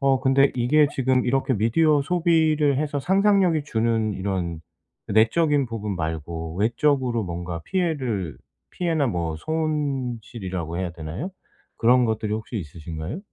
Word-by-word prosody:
어 135 -1 +3
근데 135 +1 +4
이게 145 +5 +4
지금 130 -1 +1
이렇게 135 +1 +1
미디어 145 +8 +3
소비를 160 -4 +2
해서 145 -1 -1
상상력이 190 -3 +3
주는 110 -3 0
이런 90 -4 -3 0.5
내적인 140 +7 +3
부분 105 -4 -4
말고 80 0 -4
외적으로 120 +1 +1
뭔가 85 -1 -5
피해를 130 - -2 0.3
피해나 165 -5 0
뭐 85 -6 -2
손실이라고 125 - -3
해야 90 -3 -3
되나요? 85 - -6 0.5
그런 125 +2 +4
것들이 110 -1 -1
혹시 110 +2 -5
있으신가요? 80 - -6
120 Hz, 305 characters per minute, -24 LUFS, 95-150 Hz, 0.5 s, 근데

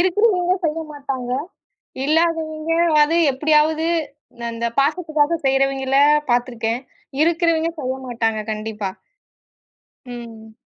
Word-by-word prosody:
இருக்கிறவங்க 370 -1 +2
செய்யமாட்டாங்க. 290 -5 -3 0.7
இல்லாதவங்க 320 0 0 0.3
அது 310 +3 +2 0.2
எப்படியாவது 310 +3 +2 0.6
அந்தப் 230 0 -4
பாசத்துக்காக 310 +1 +1
செய்யறவிங்கள 270 0 +2 0.3
பாத்துருக்கேன். 240 -1 0 0.4
இருக்கிறவங்க 330 0 +2
செய்யமாட்டாங்க 245 -4 -2
கண்டிப்பா. 215 -2 -4 1.2
ம். 225 -3 -10
280 Hz, 75 wpm, -21 LUFS, 240-320 Hz, 1.2 s, இருக்கிறவங்க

